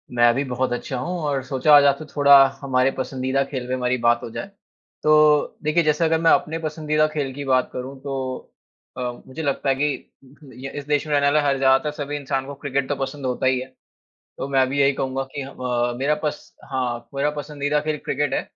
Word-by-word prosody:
मैं 120 0 +5
भी 140 - 0
बहुत 130 -1 -2
अच्छा 125 +1 -4
हूँ 180 +7 -3
और 140 -2 0
सोचा 135 +3 +4
आज 145 - +8
आपसे 140 +2 +2
थोड़ा 140 -1 +6 0.3
हमारे 130 -1 +2
पसंदीदा 130 +1 -1
खेल 130 -3 -4
पे 130 - -2
हमारी 125 0 0
बात 120 0 +3
हो - - -6
जाए। 115 - -6 0.6
तो 150 -1 +4
देखिए, 155 +3 +2
जैसे 150 +1 +1
अगर 160 0 +2
मैं 165 - +5
अपने 160 +1 +1
पसंदीदा 155 -1 0
खेल 150 -3 -3
की 145 +2 -6
बात 130 -1 +2
करूँ 130 +2 -6
तो 135 -2 -4 0.5
अ, - - -4 0.3
मुझे 130 +5 -7
लगता 140 -1 -1
है 135 - +3
कि 145 -1 -2
उहुँ, 135 +1 -17
य 135 +2 -8
इस 145 - -5
देश 150 0 +1
में 150 - -2
रहने 140 -1 +3
वाला 145 +2 +4
हर 140 -1 +2
ज़्यादातर 135 +2 +3
सभी 145 +1 -5
इंसान 135 -1 -2
को 140 - -7
क्रिकेट 140 -1 -2
तो 145 - 0
पसंद 135 +1 -5
होता 125 0 -1
ही 130 -1 +2
है। 130 - -5 0.7
तो - - -4
मैं 135 -1 +3
भी 140 +2 -1
यही 140 0 +4
कहूँगा 135 0 -1
कि 140 - -3
ह 135 - -8
व 120 -1 -1
मेरा 140 +3 +2
पस 150 0 -4 0.2
हाँ, 120 -3 -3
मेरा 140 +2 +1
पसंदीदा 145 0 -1
खेल 155 0 -2
क्रिकेट 145 +1 -1
है। - - +1
140 Hz, 225 wpm, -22 LUFS, 130-150 Hz, 0.7 s, आज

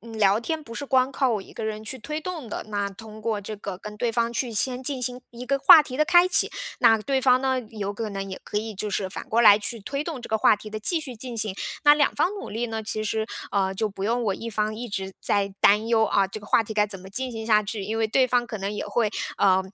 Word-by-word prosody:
呃， 230 +3 -12
聊 205 -2 +3
天 320 +5 -3
不 230 -5 -10
是 285 - -4
光 260 -1 +2
靠 270 -2 +1
我 215 -3 0
一 - - -13
个 225 - -6
人 215 0 -4
去 220 +4 -6
推 305 +6 -5
动 325 -5 -6
的， - - -5
那 205 -1 -2
通 215 +2 -12
过 220 -2 -1
这 210 +2 -7
个 195 -2 -6
跟 210 +2 -9
对 235 +2 0
方 235 0 +1
去 240 0 -2
先 250 +4 0
进 265 0 -2
行 250 0 -2
一 245 +1 -9
个 275 +2 +1
话 305 +3 +9
题 255 -3 -7
的 305 - +3
开 350 +3 +6
启， - - +3 0.3
那 225 - +6
对 265 +5 0
方 255 -1 +5
呢， 260 -1 +1
有 205 -3 -4
可 220 0 -4
能 195 -1 -5
也 190 - -6
可 210 - -2
以 220 0 -5
就 210 +2 -4
是 195 -1 -1
反 185 - -7
过 230 - +2
来 205 -3 +8
去 230 +3 -5
推 275 +8 -3
动 315 -6 -5
这 - - -9
个 220 - +1
话 215 - +5
题 215 - -10
的 215 0 -5
继 325 - 0
续 270 -5 -7
进 240 +1 -7
行。 215 -3 0 0.3
那 295 0 +8
两 295 -1 +2
方 325 +5 +2
努 405 - -7
力 230 +3 -2
呢， 225 -1 -4
其 215 0 -3
实， 220 +1 -1 0.3
呃， 190 -1 +1
就 215 +3 -1
不 195 -1 -8
用 235 +3 0
我 200 -3 0
一 230 +4 -6
方 215 0 -1
一 240 +2 -6
直 195 -2 -4
在 200 -1 0
担 210 +2 +5
忧 225 -1 +4
啊， 200 -2 +2
这 195 - -7
个 - - -13
话 230 - +4
题 220 - -7
该 210 -1 +3
怎 200 -2 -5
么 190 - -11
进 255 +6 -4
行 220 -1 -6
下 215 -2 +4
去。 210 0 -4
因 215 +3 -3
为 225 0 +1
对 260 +4 +3
方 245 -1 +1
可 220 -2 -6
能 195 +1 -3
也 210 - -4
会， 230 -3 0 0.3
呃， 190 -1 +4
220 Hz, 310 characters per minute, -25 LUFS, 205-250 Hz, 0.3 s, 话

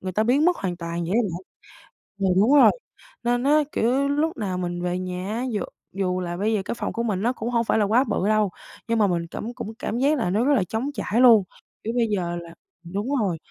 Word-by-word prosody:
người 185 -1 -4
ta 215 - +1
biến 265 +7 +3
mất 355 0 +3
hoàn 180 -3 -3
toàn 170 0 -4
vậy 175 - -3
á 235 - +4
bạn. 180 -3 -4 0.9
Ừ, - - +3
đúng 235 +8 +4
rồi, 280 - +8 0.5
nên 245 +1 +1
á, 295 +2 +4
kiểu, 260 +5 +1
lúc 295 +2 0
nào 190 -5 -2
mình 175 -1 -3
về 180 0 -1
nhà 185 +1 -4
á, 240 +3 -2
dù 205 -4 -1 0.3
dù 185 -1 -1
là 175 0 -4
bây 215 +3 0
giờ 205 - +1
cái - - -3
phòng - - -4
của 235 - -2
mình 200 -4 -1
nó 240 +3 +1
cũng 235 0 -4
hông 235 -1 +1
phải - - +1
là 210 - +3
quá 235 +6 +3
bự 205 -4 -1
đâu, 215 -2 +2 0.4
nhưng 230 -1 +1
mà 205 - +4
mình 170 -2 -1
cảm 230 +7 -6
cũng 220 - -6
cảm 230 - -3
giác 290 +3 +3
là 225 -7 0
nó 210 +6 +1
rất 290 - +4
là 215 -9 +3
trống 225 +9 -3
trải 225 -2 -1
luôn, 230 -6 +7 0.4
kiểu 225 +2 -3
bây 235 -2 +2
giờ 175 -4 -1
là 170 -1 -7 0.3
đúng 200 +7 -4
rồi. 185 -5 0
215 Hz, 260 wpm, -24 LUFS, 180-240 Hz, 0.9 s, rồi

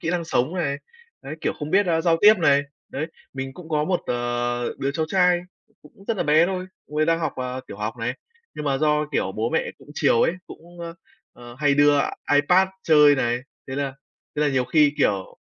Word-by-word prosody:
kỹ 165 - -2
năng 175 -1 -1
sống 150 +1 0
này, 150 -6 -1 0.5
đấy, 140 - -6
kiểu, - - 0
không 150 +1 -5
biết, 200 +2 +3
a, 165 -1 +2
giao 165 -1 +3
tiếp 210 +1 +8
này, 145 -3 +4 0.3
đấy. 150 +4 -4 0.3
Mình 135 0 -5
cũng 175 -3 -11
có 150 -2 +1
một, 180 +1 0
ờ, 120 0 -2
đứa 135 - -1
cháu 155 +3 -2
trai 180 -1 +3 0.4
cũng 150 +6 -18
rất 230 - 0
là - - 0
bé 155 +2 +4
thôi, 185 0 -3 0.2
cu 150 - -9
ấy 155 0 +2
đang 165 0 +2
học, 160 - -1
ờ, 125 0 -4
tiểu - - -9
học 105 +2 -3
này. 120 +2 -2 0.4
Nhưng 150 - -6
mà 135 -2 0
do, 150 0 +2
kiểu, 95 - 0
bố 110 +4 -2
mẹ - - 0
cũng - - -18
chiều 115 - +3
ấy, - - +3
cũng, 175 +1 -13
ơ, 170 0 -6 0.4
ờ, 120 0 -12
hay 145 -1 +3
đưa 145 0 +5
i - - +2 0.3
iPad 180 +7 +4
chơi 150 -2 +6
này, 120 -3 0 0.3
thế 130 - -4
là 140 -1 -2 0.4
thế 150 - +1
là 150 - +3
nhiều 130 -2 +1
khi, 150 +1 +3
kiểu 100 -8 0
150 Hz, 230 wpm, -23 LUFS, 130-165 Hz, 0.5 s, tiếp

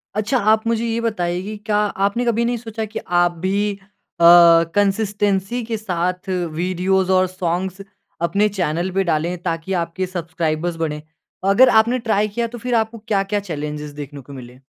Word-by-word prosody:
अच्छा 215 +5 0
आप 220 0 +2
मुझे 230 0 0
ये 230 0 -1
बताइए 180 -6 -1
कि 215 +2 -6
क्या 210 -1 +1 0.3
आपने 235 +5 -2
कभी 235 0 +1
नहीं 240 0 0
सोचा 225 -1 -6
की 215 - -6 0.2
आप 175 0 +3
भी 200 +2 +1 0.5
अ, - - +1 0.5
कंसिस्टेंसी 205 +2 0
के 225 0 -3
साथ 180 -2 -3
वीडियोज़ 185 +2 0
और 185 0 +4
सॉंग्स 185 +1 -3 0.5
अपने 205 +4 +2
चैनल 175 -2 -2
पे 195 +1 +1
डाले 170 0 0
ताकि 165 +3 -3
आपके 170 +3 -3
सब्सक्राइबर्स 165 -1 -2
बढ़ें? 150 -2 -3 0.5
अगर 250 +6 +6
आपने 240 +3 -1
ट्राई 215 -3 +1
किया 235 +3 -2
तो 240 +1 -9
फिर 245 +1 -2
आपको 225 0 0
क्या-क्या 205 -1 -1
चैलेंजेस 150 -5 -5
देखने 145 0 -8
को - - -8
मिले? 125 -1 -11
195 Hz, 165 wpm, -20 LUFS, 175-220 Hz, 0.5 s, अगर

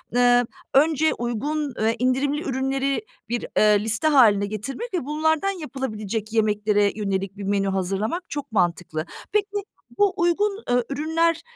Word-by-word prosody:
eee, 245 0 +5 0.3
önce 310 +2 +4
uygun, 275 +4 -2 0.3
indirimli 275 +4 +1
ürünleri, 270 +1 -1
eee, - - -3 0.3
bir 240 0 -1 0.4
liste 220 +7 +1
haline 220 -9 +5
getirmek 270 - -5
ve 340 -8 -1
bunlardan 315 +5 +1
yapılabilecek 225 - -4
yemeklere 210 -2 +2
yönelik 195 -1 -2
bir 200 - -6
menü 195 0 0
hazırlamak 195 - -1
çok 285 -3 -5
mantıklı. 175 -4 0 0.3
Peki, 410 -1 0 0.3
bu 405 -2 +3
uygun, 400 +5 +1
eee, 245 0 +3
ürünler, 320 +3 +1
255 Hz, 130 wpm, -23 LUFS, 210-315 Hz, 0.4 s, eee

